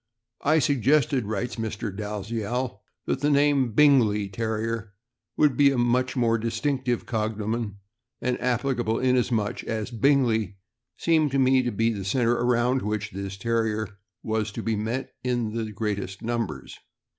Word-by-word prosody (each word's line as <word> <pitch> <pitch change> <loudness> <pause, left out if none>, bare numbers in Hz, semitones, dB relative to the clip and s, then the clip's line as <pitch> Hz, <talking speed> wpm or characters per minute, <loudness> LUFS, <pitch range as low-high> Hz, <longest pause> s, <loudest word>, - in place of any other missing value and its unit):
"I 155 +3 +3
suggested," 140 -2 +2
writes 110 +3 -3
Mr. 110 -3 -4
Dalziel, 105 +2 -3 0.2
"that - - -1
the 145 +2 +1
name 140 -4 +3
Bingley 110 -7 +4
Terrier 110 0 -3 0.4
would 150 -4 +4
be 140 +2 +6
a 135 - 0
more 120 -1 +2
distinctive 120 +1 -1
cognomen, 110 -1 -2 0.4
and 125 0 -1
applicable, 120 -2 0
inasmuch 125 -4 +1
as 110 +2 -3
Bingley 115 -6 +2 0.4
seemed 160 -3 +2
to - - +2
me 130 0 +4
to 125 -1 -1
be 115 +2 +1
the 100 -2 -5
center 120 +4 +2
around 120 +2 +2
which 105 0 -3
this 95 0 -5
Terrier 110 -1 -1 0.2
was 110 -1 -1
to - - -5
be 115 - 0
met 115 +5 -3
with 125 - 0
in 115 -3 -1
the 110 -2 -3
greatest 100 -2 -3
numbers. 115 0 -3
115 Hz, 145 wpm, -26 LUFS, 105-130 Hz, 0.4 s, be